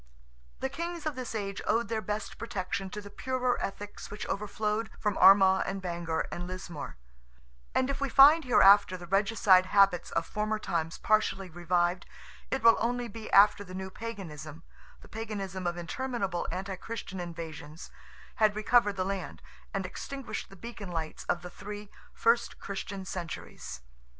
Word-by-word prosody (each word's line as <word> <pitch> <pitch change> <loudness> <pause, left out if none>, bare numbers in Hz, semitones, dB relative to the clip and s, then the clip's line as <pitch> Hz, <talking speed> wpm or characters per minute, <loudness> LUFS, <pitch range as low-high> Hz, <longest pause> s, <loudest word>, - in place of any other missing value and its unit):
The 265 - +1
kings 335 +3 -5
of 305 -3 -1
this 255 -3 -5
age 200 -2 -3
owed 235 +1 +2
their 225 -1 -1
best 210 0 -4
protection 195 -3 -3
to 210 +3 -6
the 205 0 -11
purer 255 0 -1
ethics 205 +1 -6
which 210 - -6
overflowed 210 +2 -2
from 210 -2 -1
Armagh 190 -1 +7
and 195 0 -2
Bangor 170 -3 -2
and 175 +1 -5
Lismore; 180 - -7 0.8
and 260 - +3
if 275 0 -3
we 275 - 0
find 295 +5 +8
hereafter 200 -6 +6
the 175 - -9
regicide 195 -1 +4
habits 195 -3 +4
of 165 - -1
former 215 +1 -1
times 165 -5 -2
partially 195 -3 +1
revived, 175 +1 0 0.4
it - - -2
will 230 -1 +7
only 240 +1 -1
be 225 0 -8
after 205 +1 +6
the 185 -1 -9
new 190 0 -5
Paganism—the 165 -9 -9
Paganism 195 -4 -4
of 175 0 -2
interminable 195 0 -2
anti 190 +2 -4
Christian 220 -3 -6
invasions—had 170 +5 -4
recovered 215 -1 +3
the 185 -1 -1
land, 195 -2 -4 0.3
and 195 -1 -2
extinguished 240 +3 -6
the 195 - -13
beacon 210 -1 -8
lights 160 -2 -4
of 175 0 -1
the 180 - -8
three 205 +1 -8 0.2
first 235 +1 +1
Christian 195 0 -5
centuries. 170 - -6
195 Hz, 155 wpm, -30 LUFS, 180-225 Hz, 0.8 s, find